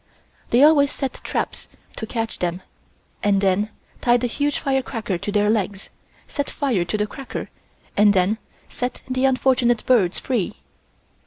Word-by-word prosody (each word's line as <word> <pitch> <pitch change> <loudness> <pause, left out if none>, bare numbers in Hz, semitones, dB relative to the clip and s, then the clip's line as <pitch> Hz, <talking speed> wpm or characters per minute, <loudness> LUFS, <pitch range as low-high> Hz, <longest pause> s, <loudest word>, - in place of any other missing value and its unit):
They 245 +4 +5
always 290 -2 +6
set 270 -2 -3
traps - - -3 0.3
to 220 - -4
catch 225 -1 -3
them 175 +1 -2 0.6
and 200 -2 +3
then 195 +2 +2 0.3
tied 240 0 +3
a - - +2
huge 290 +4 0
fire 270 -1 +1
cracker 215 -8 -3
to 205 - -3
their 205 0 +2
legs, 205 -2 -1 0.4
set 285 -2 -2
fire 255 - 0
to 175 +5 -2
the 210 - +1
cracker 270 +5 -7 0.4
and 205 0 +6
then 195 +3 +2 0.3
set 250 0 -4
the 255 +1 +1
unfortunate 255 -2 +2
birds 205 -8 +3
free. 235 -9 -1
225 Hz, 155 wpm, -22 LUFS, 205-260 Hz, 0.6 s, always